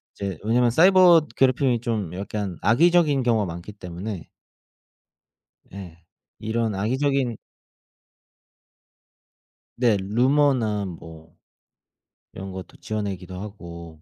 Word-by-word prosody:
이제 100 -5 -4
왜냐하면 120 +2 +2
사이버 175 +1 +6
괴롭힘이 130 -2 +2
좀 105 -8 -3
약간 100 -2 -4
악의적인 150 +2 +3
경우가 115 -4 +2
많기 85 +4 -7
때문에 90 -1 -7 1.5
예. 90 -4 -9 0.4
이런 110 0 -1
악의적인 130 +3 0 2.4
네 120 -4 +3
루머나 120 -1 +1
뭐 80 -2 -11 1.0
이런 95 0 -7
것도 95 0 -9
지어내기도 95 -4 -5
하고 85 -6 -10
105 Hz, 220 characters per minute, -23 LUFS, 95-125 Hz, 2.4 s, 사이버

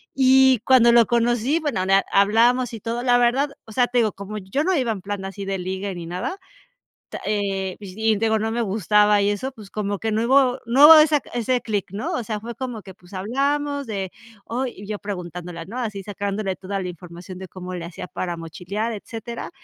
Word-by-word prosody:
y 265 -2 +5
cuando 240 -3 +6
lo 235 -1 +6
conocí 240 +5 +1
bueno, 285 - -1
eh, 195 +1 +4
hablábamos 230 +5 +3
y 225 - -6
todo 235 +1 -3
la 245 -1 +4
verdad, 260 +4 +2 0.2
o 220 - -13
sea, 245 +1 +3
te 245 0 +1
digo 220 -3 +2
como 200 +2 -7
yo 200 +11 -2
no 375 +1 +2
iba 250 -5 +1
en 195 -4 -4
plan 200 0 -5
así 195 0 -6
de 195 0 -2
ligue 190 +2 -4
ni 170 -1 -7
nada, 180 - -4 0.7
ta - - -6
eh, 195 -3 -1
y 215 +2 0
digo 220 0 +2
no 220 +1 -2
me 235 0 0
gustaba 210 0 +3
y 200 - +2
eso, 260 +6 -2
pues, 210 -5 -13
como 205 -2 -2
que 220 -1 -2
no 220 +2 +1
hubo 260 0 +3
no 265 +5 +5
hubo 320 0 +11
esa 305 -2 +4
ese 245 +1 0
clic, 205 -6 -2
¿no? 205 - -3
O 245 - -1
sea, 215 0 -3
fue 235 +1 -7
como 245 -5 -5
que, 190 -2 -12
pues, 180 +1 -17
hablamos 280 +7 -1
de, 195 -3 -4 0.3
oh, 255 +3 -2
y 205 -4 -9
yo 210 -1 -4
preguntándole, 175 -3 -6
¿no? 225 +6 -8
Así 210 -5 -3
sacándole 200 -1 -3
toda 195 +1 -4
la - - -4
información 180 +1 -10
de 190 -1 -8
cómo 185 0 -8
le 170 -2 -5
hacía 175 - -8
para 175 -2 -4
mochilear, 185 +7 -4
etcétera. 230 +5 -7
215 Hz, 215 wpm, -22 LUFS, 195-245 Hz, 0.7 s, hubo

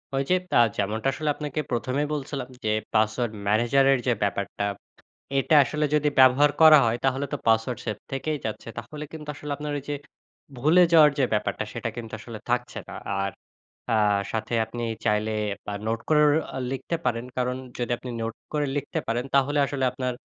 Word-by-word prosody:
ঐ - - 0
যে, 185 - +5 0.2
তা - - +3 0.2
যেমনটা 110 +5 -1
আসলে 155 -1 -2
আপনাকে 150 0 -4
১ম 125 +1 -1
এই - - -2
বলছিলাম, 140 -3 -4
যে 110 - 0 0.2
পাসওয়ার্ড 110 +2 +1
ম্যানেজারের 135 +5 +4
যে 125 - +4
ব্যাপারটা। 100 0 -2 0.7
এটা 145 +3 +2
আসলে 150 +5 -2
যদি 150 0 +3
ব্যবহার 130 +3 +6
করা 155 -1 +10
হয়, 115 +1 0
তাহলে 135 +1 +1
তো 145 - 0
পাসওয়ার্ড 115 +1 +2
সেভ 105 -3 -2 0.2
থেকেই 150 +3 -2
যাচ্ছে। 110 +1 -5
তাহলে 150 +6 -7
কিন্তু 150 -2 -9
আসলে, 150 +1 -8
আপনার 150 0 -4
ওই - - -7
যে 145 - -1 0.6
ভুলে 155 +8 +5
যাওয়ার 155 -2 +8
যে 135 - +4
ব্যাপারটা, 105 - 0
সেটা - - -3
কিন্তু 115 -2 -7
আসলে 115 -2 -8
থাকছে 125 0 -1
না। - - -8 0.3
আর 100 0 -1 0.6
আ - - +4 0.4
সাথে 110 +1 -3
আপনি 120 +2 -6 0.2
চাইলে 105 0 +1 0.3
বা - - -4 0.2
নোট 115 0 0
করেও 150 -1 +5 0.4
লিখতে 135 +5 -3
পারেন। 115 0 0
কারণ 125 0 0 0.2
যদি 120 -1 -2
আপনি 125 - -8
নোট 115 0 -3 0.2
করে 150 -1 +1
লিখতে 145 - -2
পারেন, 120 +2 0
তাহলে 140 +2 +3
আসলে 140 -1 -3
আপনার 125 0 -3
125 Hz, 180 wpm, -25 LUFS, 115-145 Hz, 0.7 s, করা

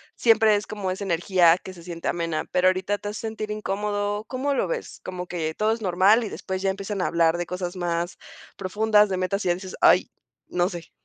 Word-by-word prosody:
siempre 220 -2 +4
es 205 - -2
como 205 -3 -4
esa 190 +2 -3
energía 175 -1 +4
que 190 - -10
se 170 -2 -13
siente 170 -1 -6
amena, 165 -2 -1
¿pero 180 +1 +4
ahorita 190 +2 -1
te 205 - -5
hace 210 - -6
sentir 220 -1 -4
incómodo? 205 0 -2
¿Cómo 270 +3 -1
lo - - +1
ves?, - - -5
¿como 180 -1 -6
que 160 -3 -3
todo 215 +1 +2
es 225 - -6
normal 195 +5 +4
y 215 - -4
después 190 -1 -5
ya 195 - +1
empiezan 195 0 -4
a - - +1
hablar 170 0 +2
de 175 - -2
cosas 180 0 -4
más 175 -1 -2 0.4
profundas, 210 +2 +3
de 185 - -1
metas, 185 +3 -1
y 180 - +2
ya 175 - +3
dices, 185 0 -8
ay, - - +5 0.4
no 180 0 0
sé? 175 -4 -9
190 Hz, 225 wpm, -25 LUFS, 175-210 Hz, 0.4 s, ay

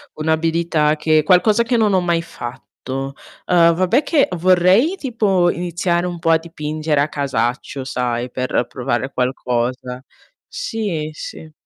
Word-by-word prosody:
un'abilità 160 0 +1
che 155 0 +2
qualcosa 205 +7 +4
che 240 +1 0
non 215 -3 +2
ho 185 - +3
mai 170 -1 +1
fatto. 130 -6 -9 0.8
Uhm, 170 -1 +5
vabbè 185 - +2
che 295 -5 +2
vorrei 185 - +4
tipo 210 - +1
iniziare 175 0 -1
un 175 -1 -5
po' 165 - 0
a 160 - +6
dipingere 155 -2 -2
a 145 - +1
casaccio, 130 -1 -2
sai, 125 -1 -2
per 130 -1 -1
provare 125 +1 -2
qualcosa. 125 0 -2 0.4
Sì, 205 - -3
sì. 155 +1 -9
160 Hz, 135 wpm, -19 LUFS, 135-180 Hz, 0.8 s, a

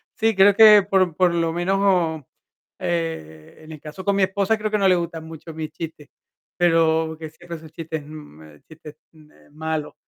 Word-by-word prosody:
Sí, 225 -2 +1
creo 195 +1 +5
que, 210 -1 +8
por 185 -4 +1
por 180 -1 +2
lo 165 -1 0
menos, 175 +3 0
o 170 -7 +1 0.5
e 160 - -5
en 155 - -12
el 155 - -9
caso 155 +5 -9
con 200 -1 +1
mi 195 - +2
esposa, 200 +3 0
creo 215 0 -3
que 215 - +1
no 200 -2 +2
le 185 - +5
gustan 170 -2 -4
mucho 160 0 -10
mis 155 -1 -6
chistes, 160 -3 -9 0.5
pero 160 -2 +2
que 160 -1 -7
siempre 170 +2 -10
esos 160 -1 -14
chistes 160 -1 -6
me 80 - -13
chistes 155 -1 -14 0.2
me 155 -1 -22
malos. 155 0 -4
165 Hz, 190 wpm, -22 LUFS, 155-190 Hz, 0.5 s, que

